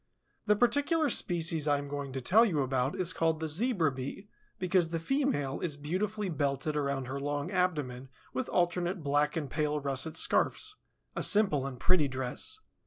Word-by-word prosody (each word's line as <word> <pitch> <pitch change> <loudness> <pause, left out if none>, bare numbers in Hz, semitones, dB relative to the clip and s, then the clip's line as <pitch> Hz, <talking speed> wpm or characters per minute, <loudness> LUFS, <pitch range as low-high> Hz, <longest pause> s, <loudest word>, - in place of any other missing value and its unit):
The 210 - +5
particular 285 +7 +2
species 165 -5 +2
I 145 -1 +3
am 145 0 -5
going 140 -1 -5
to 135 - -3
tell 210 - +5
you 170 -11 +1
about 130 +1 0
is 185 0 +1
called 160 -1 +1
the 160 - -2
Zebra 175 - +1
Bee, 135 +10 -6 0.3
because 180 -2 +1
the 165 - -2
female 165 - 0
is 155 -5 -2
beautifully 195 +8 -2
belted 145 -1 -1
around 140 -2 -1
her 135 +2 -4
long 145 +4 -3
abdomen 150 -9 -1 0.2
with 130 - -3
alternate 175 0 0
black 145 +2 +1
and 150 -3 -2
pale 150 +2 -1
russet 140 +3 -1
scarfs; 425 - +1 0.4
a - - -2
simple 170 -11 +3
and 130 -3 -7
pretty 175 -3 +3
dress. 130 - -4
155 Hz, 175 wpm, -30 LUFS, 140-185 Hz, 0.4 s, The